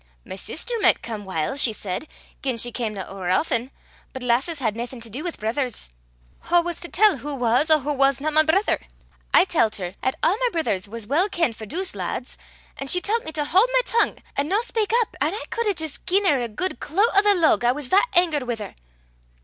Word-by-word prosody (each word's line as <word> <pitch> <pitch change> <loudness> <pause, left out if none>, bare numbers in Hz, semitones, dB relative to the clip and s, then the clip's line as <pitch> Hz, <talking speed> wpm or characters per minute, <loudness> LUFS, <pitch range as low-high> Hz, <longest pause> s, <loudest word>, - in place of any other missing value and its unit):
My - - -7
sister 310 - -4
micht - - +4
come 215 -3 -5
whiles, 190 - -1
she 225 - +3
said, 205 +7 -4 0.3
gien 260 -3 -2
she 240 +1 -1
camna 215 -6 -3
ower 190 -2 -5
aften; 235 - +1 0.4
but 260 -2 -7
lasses 255 +7 +1
had 225 -6 -1
naething 240 +2 -6
to 230 -1 -7
dee 260 +7 -5
wi' 350 - -2
brithers. 240 - -2 0.6
Wha 345 +1 +5
was 345 -1 -4
to 345 - -7
tell 410 -5 +4
wha 290 +2 -5
was 250 +4 +2
or 310 - +7
wha 295 +3 -2
wasna 275 +2 +2
my 310 +1 +5
brither? 325 +7 +2 0.5
I - - +6
tellt 230 - +1
her 180 -2 -5
'at 260 - 0
a' - - +5
my 475 +7 +1
brithers 205 - -1
was 225 +1 -5
weel 330 - +1
kenned 335 - 0
for 220 - -9
douce 370 - -2
laads; 200 +6 -4 0.4
an' 275 - -5
she 360 - +3
tellt 445 +5 -1
me 315 - -5
to 300 -1 -1
haud 380 +11 +4
my - - +5
tongue, 465 - +1 0.2
an' 280 +1 0
no 400 +6 +1
speyk 450 -3 -1
up; - - -15
an' 310 +7 +1
I 440 - -5
cud 465 -1 -1
hae 405 - +1
jist 315 -3 -3
gi'en 395 +3 +2
her 285 -8 +3
a 235 - -3
guid 365 - -3
cloot 400 +10 +1
o' 400 - +7
the 410 -1 +4
lug 325 -8 +3
I 240 - +4
was 270 0 -3
that 400 +6 +4
angert 320 -7 +2
wi' 240 - -1
her." 215 - -8
285 Hz, 230 wpm, -23 LUFS, 235-360 Hz, 0.6 s, or